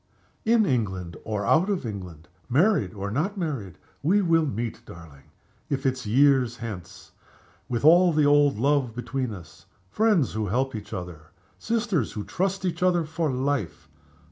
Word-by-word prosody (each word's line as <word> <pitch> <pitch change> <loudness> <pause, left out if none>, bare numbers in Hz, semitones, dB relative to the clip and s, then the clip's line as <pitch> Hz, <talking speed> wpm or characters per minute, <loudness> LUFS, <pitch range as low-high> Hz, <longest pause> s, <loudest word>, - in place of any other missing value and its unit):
"In 225 -1 +4
England 95 - -2
or 105 -2 -3
out 175 - +3
of 195 -9 -1
England, 90 -7 -7 0.2
married 140 - +2
or 100 0 -4
not 175 - -1
married, 135 - -4 0.2
we 185 +8 +3
will 165 -4 +2
meet, 115 -1 -4
darling 80 -5 -13 0.4
if 135 0 -2
it's 130 -3 -1
years 130 0 +3
hence 105 -7 -8 0.6
with 120 +3 -1
all 175 +3 +7
the 155 -2 +2
old 145 -3 +4
love 135 -2 +1
between 130 0 -3
us; 95 -5 -12 0.2
friends 210 - +2
who 110 -1 -2
help 130 +7 0
each 105 -2 -7
other, 90 -4 -7 0.3
sisters 220 - -1
who 105 - -4
trust 190 - -2
each 175 0 -2
other, 180 -2 +3
for 160 -1 -2
life! 130 -6 -2
130 Hz, 155 wpm, -25 LUFS, 105-165 Hz, 0.6 s, all